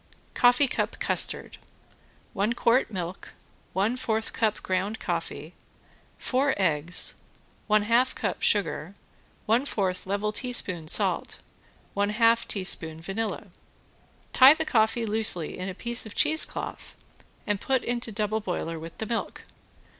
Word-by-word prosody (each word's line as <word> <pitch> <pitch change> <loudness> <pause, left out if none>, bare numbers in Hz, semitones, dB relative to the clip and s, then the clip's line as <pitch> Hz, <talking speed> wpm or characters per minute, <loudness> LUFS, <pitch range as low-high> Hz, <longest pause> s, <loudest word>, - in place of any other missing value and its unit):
~COFFEE 245 +3 +4
CUP - - -2
CUSTARD~ - - +1 0.8
One 205 +4 0
quart 235 +2 +2
milk, 180 -2 -6 0.4
one 205 +6 0
fourth 225 -3 -2
cup 220 -3 -1
ground 190 +4 -2
coffee, - - -4 0.6
four 270 +2 +1
eggs, 170 -2 0 0.5
one 215 -1 +3
half 235 +4 +2
cup - - -3
sugar, 200 -3 0 0.5
one 230 +4 +2
fourth 190 -9 -2
level 205 +2 -1
teaspoon 205 -9 -2
salt, - - +2 0.6
one 200 0 0
half 230 +1 +3
teaspoon 165 -5 +1
vanilla. 195 +6 -4 0.9
Tie 270 +3 +8
the 320 - -2
coffee 225 -2 +2
loosely 215 -7 +1
in 185 +1 -5
a 185 - -7
piece 235 +2 0
of 210 - -11
cheesecloth 315 +1 +1 0.5
and 205 -2 -1
put 265 -2 0
into 240 -1 -3
double 215 +1 -1
boiler 165 -4 -4
with 165 +1 -10
the 220 - -4
milk. 230 +1 -4
215 Hz, 130 wpm, -26 LUFS, 190-235 Hz, 0.9 s, Tie